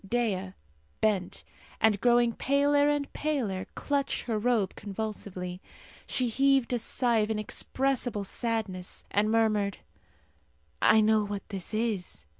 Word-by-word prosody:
Dea, 195 -3 -1 0.5
bent, 200 -4 0 0.4
and 210 -2 +3
growing 240 -1 +4
paler 285 +2 +3
and 290 -1 -1
paler, 245 -12 -2
clutched 280 -1 -1
her 225 -3 -1
robe 220 -4 +1
convulsively. 195 -3 -5 0.5
She 255 - 0
heaved 270 +1 +2
a 245 - +1
sigh 235 0 +1
of 210 0 +1
inexpressible 235 +1 -1
sadness, 200 -4 -3
and 210 +1 +2
murmured, 215 -3 +2 1.0
"I 220 - +6
know 215 0 +4
what 205 -1 -5
this 195 +1 -4
is. 210 - -2
220 Hz, 120 wpm, -29 LUFS, 200-245 Hz, 1.0 s, I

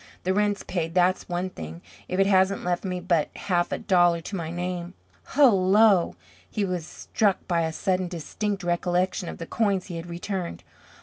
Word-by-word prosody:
The 185 - +1
rent's 205 0 +1
paid, 165 -2 -3
that's 185 +1 +2
one 180 +1 -2
thing, 80 - -8 0.2
if 185 - -2
it 195 - +5
hasn't 190 0 +3
left 175 0 -1
me 180 -2 -2
but 175 -3 +1
half 175 -3 0
a - - 0
dollar 175 -2 +3
to 195 - -6
my 165 -3 -3
name. 175 +1 -4 0.4
Hullo!" 205 -6 +5 0.3
He 210 -2 -1
was 180 -3 -3
struck 200 0 -1
by 170 -2 +1
a 160 0 0
sudden 185 +2 0
distinct 195 +4 -3
recollection 175 +1 0
of - - -7
the 165 - -6
coins 200 -2 0
he - - -4
had 165 +1 -7
returned. 175 - -4
180 Hz, 180 wpm, -26 LUFS, 175-195 Hz, 0.4 s, it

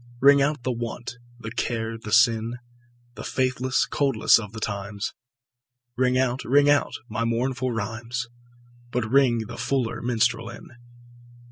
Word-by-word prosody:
Ring 140 +1 +6
out 145 -2 0
the 130 - 0
want, 120 +1 -5 0.2
the 115 -1 -7
care 115 -1 -2
the 110 -1 -8
sin, 115 +2 +3 0.6
The 110 - -9
faithless 130 0 0
coldness 135 -6 +3
of 105 -3 -7
the 110 - -7
times; 100 -1 -4 0.8
Ring 125 0 +2
out, 130 0 0
ring 145 +3 +4
out 145 - +2
my 115 +1 -2
mournful 125 +2 -1
rhymes, 115 +2 -4 0.6
But 120 -2 -1
ring 125 -5 +3
the - - -8
fuller 125 -1 -1
minstrel 120 -1 0
in. 120 - -11
120 Hz, 140 wpm, -25 LUFS, 115-130 Hz, 0.8 s, Ring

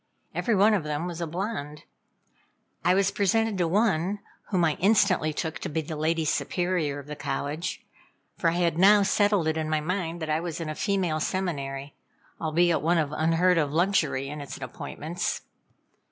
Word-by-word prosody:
Every 230 - +1
one 205 +3 +5
of 195 -6 +1
them 150 +2 -2
was 175 -1 -5
a 170 - -1
blonde. 160 -4 -4 1.0
I 180 +2 +4
was 195 0 +2
presented 210 +2 +1
to 175 - +2
one, 195 0 +1 0.3
whom 180 -4 +2
I 155 - +2
instantly 195 -5 +3
took 160 +1 -4
to 185 - -4
be 160 +1 -1
the 155 +1 -6
Lady 160 +1 0
Superior 155 +1 0
of 140 - -8
the 150 +1 -6
College, 145 +4 -4 0.5
for 165 - +2
I - - -1
had 170 -1 +1
now 200 +2 +7
settled 205 -3 +2
it 160 0 0
in 155 -1 -2
my 155 0 +1
mind 170 +1 -2
that 155 - -4
I 155 - +2
was 170 0 -4
in 165 -2 -4
a - - -2
female 180 -3 0
seminary, 140 -6 -3 0.5
albeit 165 +2 +2
one 170 +3 +2
of 150 -3 0
unheard 165 +3 +3
of 145 -3 0
luxury 160 -5 +1
in 150 +1 -6
its 140 - -7
appointments. 170 +3 -4
165 Hz, 180 wpm, -27 LUFS, 155-185 Hz, 1.0 s, now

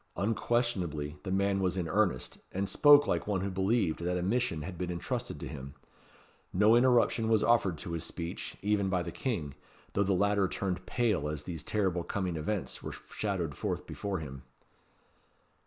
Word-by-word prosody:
Unquestionably 100 - 0
the - - -6
man 100 +1 +2
was 95 -1 0
in 90 -3 -1
earnest, 90 -6 0
and 100 +1 -1
spoke 145 +4 +7
like 85 +2 -1
one 100 -3 0
who 100 0 -2
believed 95 -2 +1
that 90 +1 -1
a 90 - -1
mission 100 -6 0
had 90 +2 -6
been 90 +1 -3
entrusted 85 -1 -3
to - - -5
him. 70 -1 -8 0.8
No 105 +5 +5
interruption 120 -2 +4
was 110 -2 +4
offered 105 -8 +3
to 80 - -6
his 85 -1 -2
speech, 85 0 -5
even 100 -1 +2
by 90 -2 +1
the 85 - -5
King, 85 - -3 0.4
though 100 - +1
the 100 -1 +2
latter 100 +1 +3
turned 95 0 -3
pale 105 - +1
as 75 -1 -4
these 80 -1 -5
terrible 95 -4 0
coming 95 -3 -2
events 85 +5 -2
were - - -5 0.2
shadowed 90 -8 -2
forth - - -3
before 100 -2 -3
him. 70 -5 -7
95 Hz, 175 wpm, -31 LUFS, 85-105 Hz, 0.8 s, spoke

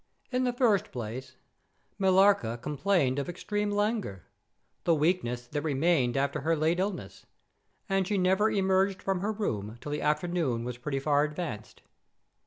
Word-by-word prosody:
In 255 0 +1
the 245 - 0
first 235 -6 +2
place, 120 +2 -6 0.6
Millarca 190 - +4
complained 145 0 +1
of 140 - -3
extreme 205 +4 -2
languor—the 205 - -3
weakness 145 -7 0
that 145 +4 -3
remained 145 -3 +1
after 140 0 0
her 165 +3 +1
late 160 +3 +1
illness—and 195 0 -5
she 205 - 0
never 190 +3 +3
emerged 190 -1 +2
from 195 -2 0
her 205 +4 -1
room 110 - -3
till 145 - -7
the 150 - -2
afternoon 150 -6 0
was 125 0 -5
pretty 135 +1 -2
far 145 +1 +2
advanced. 150 -8 -5
165 Hz, 140 wpm, -29 LUFS, 135-195 Hz, 0.6 s, Millarca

